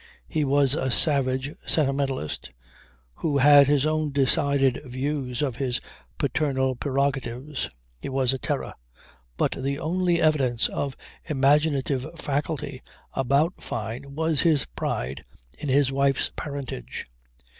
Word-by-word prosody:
He 155 -2 0
was 140 -1 +3
a 130 -3 0
savage 135 0 +3 0.2
sentimentalist 135 - 0 0.7
who 150 -3 0
had 140 0 +7
his 145 -1 +3
own 155 -1 0
decided 140 -1 +2
views 130 0 -3
of 130 -5 -2
his 125 -3 0 0.4
paternal 130 -4 0
prerogatives. 135 - -2 0.3
He - - -6
was 130 -1 +2
a 135 - -3
terror; - - -3 0.6
but - - +1
the 140 +1 -2
only 175 +2 +1
evidence 135 -7 +2
of 140 -2 -3 0.3
imaginative 140 -2 +2
faculty 145 -2 -3 0.3
about 140 +7 +1
Fyne 120 +6 -5
was 160 -1 +2
his 155 -6 +3
pride 60 +2 -4 0.4
in 145 - -4
his 135 0 +3
wife's 135 0 +1
parentage. 140 - -5
140 Hz, 120 wpm, -25 LUFS, 130-150 Hz, 0.7 s, had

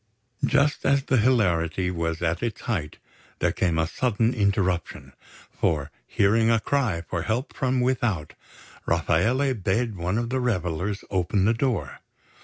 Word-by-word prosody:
Just 145 +1 +2
as 140 0 +3
the 130 - +1
hilarity 90 -7 +2
was 85 -1 -2
at 85 0 0
its 115 -4 -3
height, 80 -10 -3 0.4
there - - +1
came 85 -4 0
a 80 - +2
sudden 115 +5 0
interruption; 95 - -1 0.4
for, 75 -2 -1 0.2
hearing 110 +3 +3
a 115 -1 +4
cry 110 -10 0
for 85 - -2
help 115 - -2
from 130 -2 0
without, 120 -11 0 0.5
Rafaele 110 - +2
bade 110 +1 -1
one 90 +3 -2
of 120 0 -2
the 130 - 0
revellers 95 -4 -1
open 95 +1 +1
the 110 - +4
door. 120 -1 -2
105 Hz, 145 wpm, -25 LUFS, 85-120 Hz, 0.5 s, a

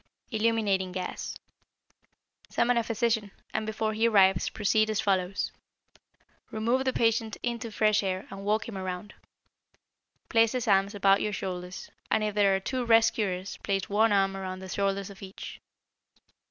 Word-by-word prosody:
=Illuminating 215 -4 +1
Gas.= 185 -1 -4 1.1
Summon 245 +1 +2
a 235 - +3
physician, 225 -2 0 0.2
and 215 - -1
before 220 0 -1
he 225 +2 +2
arrives 190 -5 +4
proceed 215 +1 +1
as 215 -2 0
follows: 190 -1 0 1.0
Remove 235 +5 0
the 260 - +2
patient 225 -2 +1
into 235 -1 -2
fresh 215 0 +2
air 190 -1 -2
and 195 0 -7
walk 215 +2 0
him 230 - -7
around. 185 +2 -5 1.1
Place 225 -1 +3
his 250 -3 -2
arms 200 0 +3
about 195 0 +4
your 210 - -1
shoulders, 180 -2 -5 0.2
and 220 - +2
if 210 -1 -1
there 200 -2 +4
are - - 0
two 255 +6 -2
rescuers 220 -5 +2
place 195 -1 -2
one 215 +2 +3
arm 195 -1 +2
around 185 -1 -5
the 190 0 -9
shoulders 195 0 -1
of 195 - -14
each. 195 0 -9
205 Hz, 155 wpm, -28 LUFS, 195-225 Hz, 1.1 s, arrives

